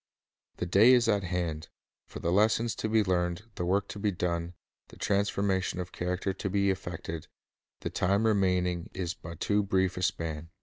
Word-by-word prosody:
The - - -2
day 100 +8 +6
is 120 -2 +4
at 100 -4 +2
hand. 85 -3 -2 0.4
For - - -9
the 85 - 0
lessons 110 +4 +3
to 110 - -2
be 110 0 +4
learned, 90 -2 0
The - - -14
Emi - - -36
the 90 - -1
work 100 +3 +1
to 105 - -6
be 105 +1 +1
done, 85 -1 -2 0.3
the - - -15
transformation 100 -2 0
of 90 0 -5
character 90 +2 -2
to 95 +1 -4
be 100 0 +2
effected, 85 -3 -5 0.5
the - - -3
time 100 +4 +1
remaining 90 -5 +1
is 90 -2 -2
but 80 0 -10
too 105 0 +2
brief 95 -2 +1
a - - -3
span. 80 -3 -2
95 Hz, 190 wpm, -29 LUFS, 90-100 Hz, 0.5 s, day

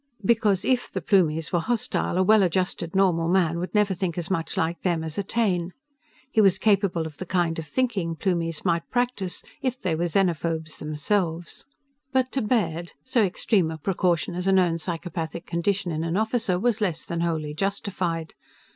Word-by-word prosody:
Because 210 -4 +3
if 255 -1 +1
the - - -2
Plumies 165 -6 +2
were 175 - +3
hostile, 220 -2 -1
a 185 - +4
well 215 +2 +6
adjusted, 180 -1 0
normal 175 -4 +3
man 170 -2 +2
would 180 +4 -4
never 210 -2 +3
think 180 -2 -2
as 175 +2 -3
much 165 -3 -2
like 165 +1 0
them 170 -3 0
as 160 +3 -4
a - - 0
Taine. 185 -5 0 0.6
He 220 - +4
was 195 -3 +5
capable 200 -6 +2
of 155 -2 -9
the 185 - -4
kind 170 -2 0
of 160 - -6
thinking 205 -10 -1
Plumies 165 -3 -1
might 170 -2 0
practice, 245 -8 -1 0.2
if 255 -1 -1
they 175 - -1
were 170 +2 0
xenophobes 165 -3 0
themselves. 165 - -2 0.4
But 260 -1 +1
to 270 - -1
Baird, 175 -7 0
so 255 -2 +2
extreme 190 -2 +1
a 160 - -5
precaution 175 0 0
as 180 +2 -3
a - - +5
known 180 -3 +3
psychopathic 165 0 -4
condition 180 +1 -1
in 160 0 -2
an 165 +2 -1
officer 220 -3 +1
was 225 0 +1
less 175 -6 -1
than 170 0 -3
wholly 160 -3 -1
justified. 180 -2 -2
180 Hz, 180 wpm, -25 LUFS, 165-200 Hz, 0.6 s, well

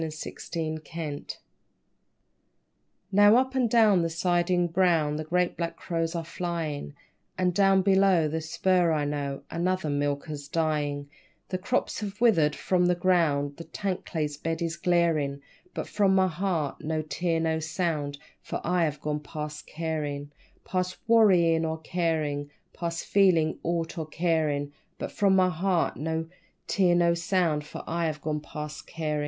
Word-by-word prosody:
_ - - -1
Past 155 0 -5
Carin' 155 -2 -6 1.8
Now 205 +2 +7
up 260 +1 +2
and 255 -3 +2
down 215 -5 +5
the 165 - 0
siding 175 +1 +1
brown 165 -4 +2
The 155 - -3
great 180 +3 0
black 170 -1 -3
crows 165 -1 -2
are 165 -1 -3
flyin', 165 -4 -4 0.4
And 180 -1 +1
down 195 0 +4
below 190 -4 +4
the 160 +2 -2
spur, 175 +2 +2
I 150 -2 0
know, 145 -1 -3
Another 175 -2 0
'milker's' 145 0 -2
dyin'; 145 -3 -1 0.4
The 185 - -2
crops 250 +6 -1
have 205 -1 -6
withered 165 -11 +4
from 180 -1 +1
the 180 - +3
ground, 160 -6 +1
The 165 - -7
tank's 195 -3 -4
clay 155 -4 0
bed 165 +1 -2
is 165 0 -2
glarin', 165 -5 +1 0.3
But - - -3
from 195 -2 +2
my 190 0 +4
heart 175 -4 -2
no 155 0 -1
tear 165 +2 -1
nor 160 -1 0
sound, 155 -3 -2 0.2
For - - -4
I 175 0 +2
have 150 -2 -3
gone 150 0 -2
past 150 0 -7
carin' 150 -3 -3 0.3
_Past 185 0 -2
worryin' 180 -8 +5
or 160 0 -1
carin', 155 -4 -1 0.2
Past 170 -1 -4
feelin' 175 -6 +3
aught 165 0 -2
or 160 - -4
carin'; 155 -3 0 0.3
But - - -5
from 195 -2 +3
my 185 -1 +4
heart 180 +1 0
no 160 +2 -2 0.4
tear 180 -3 +3
nor 170 -1 +4
sound, 170 -3 0
For - - -8
I 170 0 -1
have 155 -1 -3
gone 150 0 -2
past 150 0 -7
carin'. 155 -2 -2
165 Hz, 155 wpm, -27 LUFS, 150-180 Hz, 1.8 s, Now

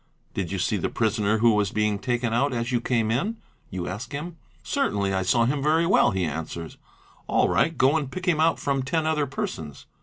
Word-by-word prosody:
'' - - -40
Did 90 -4 -3
you 95 - -2
see 100 +3 0
the 90 - -1
prisoner 110 -1 +1
who 115 +1 +4
was 105 -2 +1
being 105 -1 0
taken 120 0 -1
out 135 +4 +1
as 115 +1 -2
you 120 -1 +1
came 115 -3 0
in?" 200 - -1 0.3
you 90 -1 -4
ask 105 +9 -6
him. 165 +4 -5 0.3
Certainly 100 -1 0
I 95 - +1
saw 115 +6 +3
him 140 +3 0
very 160 +3 +3
well,' 170 -8 +4
he 95 -5 -1
answers. 80 +1 -5 0.5
''All - - +3
right, 165 +2 +1
go 135 +4 +4
and 145 -4 -3
pick 185 -1 -6
him 170 -5 +2
out 165 +1 +3
from 140 -1 -1
ten 155 +5 -1
other 155 -2 +1
persons." 80 - -5
120 Hz, 220 wpm, -25 LUFS, 100-145 Hz, 0.5 s, who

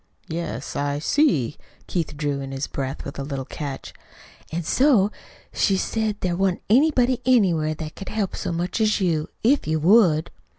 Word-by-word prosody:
"Yes, 160 -7 -4
I 145 0 -1
see." 150 - +1 0.3
Keith 160 -4 -3
drew 145 -2 -1
in 135 0 -6
his 135 +1 -3
breath 135 -1 -5
with - - -7
a - - -2
little 135 -2 -4
catch. 140 -1 -6 0.6
"An' 170 +2 -2
so 220 - +3 0.4
she 195 -3 +2
said 215 +1 -1
there 180 -2 0
wa'n't 190 -1 0
anybody 255 -1 +4
anywhere 175 -11 +3
that 155 0 -7
could 195 - -8
help 210 -3 -2
so - - -3
much 175 +6 -2
as 215 -1 +2
you 165 -5 0 0.2
if 265 - +3
you 160 0 +1
would." 175 -3 +4
170 Hz, 170 wpm, -23 LUFS, 150-215 Hz, 0.6 s, anybody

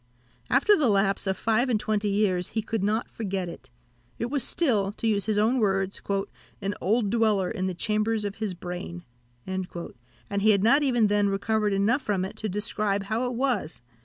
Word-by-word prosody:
After 290 +12 +5
the 290 - +2
lapse 195 -1 +2
of 190 - 0
five 230 +3 +1
and 225 -4 +2
twenty 210 -1 -1
years, 195 -3 +1
he 220 - +1
could 220 -2 -2
not 215 +3 0
forget 195 -4 -3
it; 150 -5 -10 0.5
it 235 +2 -3
was 285 -3 +2
still, 215 - +1
to 230 - -6
use 210 -2 +1
his 215 -1 +1
own 225 +5 +3
words, 195 -2 0 0.6
"an 200 0 -2
old 210 +2 +1
dweller 215 -5 +2
in 190 -4 -2
the 185 - -3
chambers 215 +3 0
of 200 -1 -4
his 215 -4 -3
brain," 175 0 -6 0.4
and 190 -1 -3 0.7
he 215 +2 +3
had 200 -2 +4
not 275 +7 +5
even 245 -6 +3
then 205 -1 +2
recovered 210 +1 0
enough 205 +8 +2
from 200 -6 -1
it 190 - -8
to 215 - -3
describe 205 0 -1
how 220 +5 -1
it 245 - -3
was. 245 - -1
210 Hz, 190 wpm, -26 LUFS, 195-225 Hz, 0.7 s, After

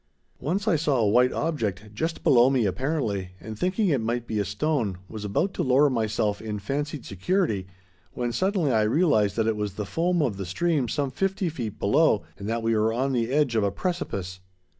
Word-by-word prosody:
Once 190 - -2
I 170 - +4
saw 145 -3 +1
a 110 -3 +2
white 125 +4 +4
object, 110 - -2
just 160 +9 -3
below 130 -5 +6
me 130 -4 +2
apparently, 105 - -2
and 110 -1 -7
thinking 185 - 0
it 140 -7 +2
might 120 +1 -2
be 110 -2 -2
a 100 - 0
stone, 105 - -1
was 110 0 -7
about 105 - 0
to - - -2
lower 135 +2 +4
myself 110 -3 0
in 110 -1 -4
fancied 140 +6 -3
security 100 - -1 0.5
when 120 -1 -2
suddenly 185 - +1
I 110 - +3
realized 110 - +2
that 115 - +1
it 110 -1 +1
was 105 -2 -3
the 105 - -3
foam 170 - +1
of 115 -8 -1
the 95 - -4
stream 145 - 0
some 140 +3 -1
fifty 190 +4 -1
feet 120 -9 -5
below, 135 - +3 0.2
and 100 +1 -5
that 115 0 -1
we 115 0 +2
were 110 +1 +2
on 130 +4 0
the 120 -3 0
edge 140 -3 +2
of 110 - +2
a 100 - +2
precipice! 100 - -3
120 Hz, 205 wpm, -26 LUFS, 105-150 Hz, 0.5 s, below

